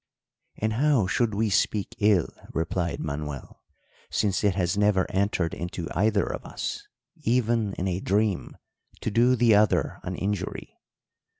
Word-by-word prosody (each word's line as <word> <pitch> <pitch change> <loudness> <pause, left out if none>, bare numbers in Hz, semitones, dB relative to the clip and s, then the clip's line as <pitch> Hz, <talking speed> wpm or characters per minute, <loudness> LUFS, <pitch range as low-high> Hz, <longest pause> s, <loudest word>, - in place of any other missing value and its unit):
"'And 110 +1 -1
how 135 -3 +3
should 110 +2 0
we 110 0 +1
speak 100 +1 +1
ill,' 105 -5 +3 0.2
replied 85 +1 -1
Manuel, 75 -2 -5 0.5
'since 100 -2 0
it 100 -3 +3
has 90 -2 0
never 105 -2 +3
entered 95 -3 0
into 85 -1 -5
either 105 0 +2
of - - -5
us, - - -5 0.3
even 115 -3 +1
in 95 - -2
a 90 0 -1
dream, 100 0 0 0.4
to 115 - -2
do 120 +4 +4
the 115 -2 +4
other 105 +1 +2
an - - -4
injury? 100 -1 -4
100 Hz, 140 wpm, -26 LUFS, 90-110 Hz, 0.5 s, do